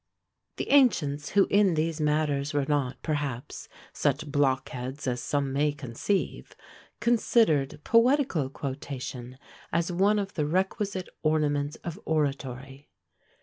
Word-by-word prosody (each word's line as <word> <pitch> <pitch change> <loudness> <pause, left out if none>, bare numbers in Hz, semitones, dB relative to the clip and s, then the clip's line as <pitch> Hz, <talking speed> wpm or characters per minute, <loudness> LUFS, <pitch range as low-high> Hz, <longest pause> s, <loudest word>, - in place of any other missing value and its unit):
The - - -3
ancients, 155 - +3
who 200 -1 +4
in 200 -4 +4
these 160 0 -1
matters 150 -1 0
were 145 -1 +2
not, 135 -4 0
perhaps, 145 -5 -4 0.2
such - - 0
blockheads 135 -1 -1
as 125 -2 -1
some 140 +1 -1
may 145 +1 +2
conceive, 145 - -3 0.4
considered 220 - +2
poetical 230 - +3
quotation 130 -2 -6 0.3
as 170 +1 0
one 195 +4 +3
of 200 -1 -2
the 150 -3 -1
requisite 190 +2 -1
ornaments 150 -2 +1
of 170 -2 -5
oratory. 140 -2 -3
150 Hz, 115 wpm, -27 LUFS, 135-180 Hz, 0.4 s, who